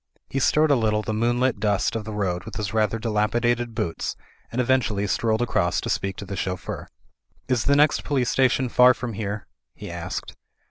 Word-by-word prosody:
He 135 - 0
stirred 150 +3 +3
a - - +6
little 110 -3 +1
the 110 - -2
moonlit 120 +2 +1
dust 105 +1 +1
of 110 -2 -3
the 110 - -5
road 95 -4 -2
with 110 - -9
his 105 -1 -3
rather 110 0 +1
dilapidated 115 +2 0
boots 80 - -2 0.4
and 120 - -3
eventually 120 -5 +1
strolled 110 +2 +1
across 120 - +1
to - - -2
speak 95 -1 -1
to 100 - -7
the 100 0 -5
chauffeur. 90 -1 -4 0.6
"Is 125 -3 +1
the 140 - +4
next 150 +1 +3
police 130 -4 0
station 130 0 +2
far 125 +1 +6
from 120 -2 -5
here?" 100 0 -4 0.3
he - - -8
asked. - - -5
110 Hz, 190 wpm, -24 LUFS, 105-125 Hz, 0.6 s, a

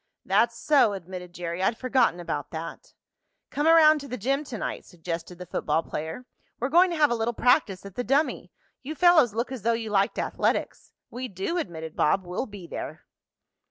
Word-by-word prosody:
"That's 230 +5 +2
so," 280 -8 +4
admitted 180 -1 -8
Jerry. 175 0 -5
"I'd 225 +4 +1
forgotten 255 -9 +2
about 145 -4 -4
that." 165 +1 -8 0.6
"Come 295 +2 0
around 310 -2 +7
to 280 - -8
the 250 - -5
gym 275 +7 0
to 250 -5 -6
night," - - -4
suggested 170 0 -6
the 180 - -8
football 165 -1 -1
player. 160 +11 -6 0.3
"We're 250 - -1
going 350 +5 +5
to 340 - -3
have 295 -3 +4
a - - +2
little 230 +1 -1
practice 205 -6 +2
at 200 - -9
the 245 - -3
dummy. 280 +5 0 0.3
You 300 +4 -6
fellows 315 - +5
look 235 +3 -2
as 260 -4 -5
though 235 +3 +2
you 225 -2 -3
liked 200 +1 +1
athletics." - - -1 0.2
"We 255 +1 -5
do," 200 - -3
admitted 160 - -6
Bob. 185 +5 +2
"We'll 180 +9 -3
be 205 -4 -10
there." - - -7
225 Hz, 195 wpm, -26 LUFS, 180-270 Hz, 0.6 s, around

